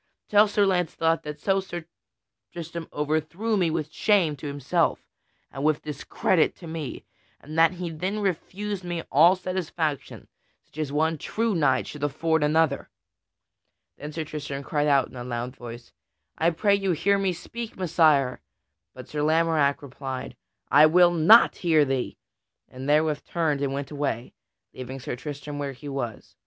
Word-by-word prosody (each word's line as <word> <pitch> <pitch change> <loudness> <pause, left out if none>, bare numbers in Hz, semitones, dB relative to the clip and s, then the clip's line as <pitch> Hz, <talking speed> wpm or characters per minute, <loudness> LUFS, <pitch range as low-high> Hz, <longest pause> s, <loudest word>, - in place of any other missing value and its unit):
Tell 210 +1 +6
Sir 205 0 +2
Launcelot 165 -3 +1
that 150 0 -7
so 195 +4 +1
Sir 175 -3 -6 0.7
Tristram 170 0 -7
overthrew 155 +9 -1
me 180 -5 +2
with 155 -1 -3
shame 185 -8 +2
to 145 - -7
himself 145 +4 0 0.5
and 135 - -6
with 155 0 +1
discredit 155 +3 0
to 175 - -12
me, 160 -3 -6 0.3
and 155 +2 -10
that 165 +1 +5
he 175 -2 -5
then 185 +6 -3
refused 195 +1 -3
me 175 -2 -4
all 165 +7 +6
satisfaction 170 -6 -3 0.4
such 155 - -14
as 150 -3 -2
one 160 +1 +1
true 225 +6 -1
knight 145 -7 +2
should 150 -1 -8
afford 160 +2 +1
another." 155 -1 +1 1.1
Then 150 +1 -8
Sir 160 +1 -3
Tristram 145 -2 -6
cried 150 +1 0
out 140 -3 +4
in - - -16
a 120 - -6
loud 120 +1 -4
voice, 120 -1 -10 0.4
"I 165 - +2
pray 200 +5 +2
you, 195 -2 +1
hear 200 +5 +2
me 195 -1 +1
speak, 225 +6 -7
Messire!" 155 -7 +3 0.5
But - - -10
Sir 150 - -3
Lamorack 155 -2 +2
replied, 135 -1 -6 0.4
"I 145 +4 +8
will 175 +2 +5
not 175 +8 +6
hear 160 -4 +3
thee!" 135 -2 -2 0.5
and 130 +2 -7
therewith 150 -1 +2
turned 155 -5 -1
and 140 -1 0
went 140 +1 -4
away, 140 -5 -3 0.4
leaving 130 +1 -7
Sir 125 - -5
Tristram 145 +2 -7
where 140 -1 -3
he 145 +3 -11
was. 130 -6 -5
155 Hz, 160 wpm, -25 LUFS, 140-175 Hz, 1.1 s, I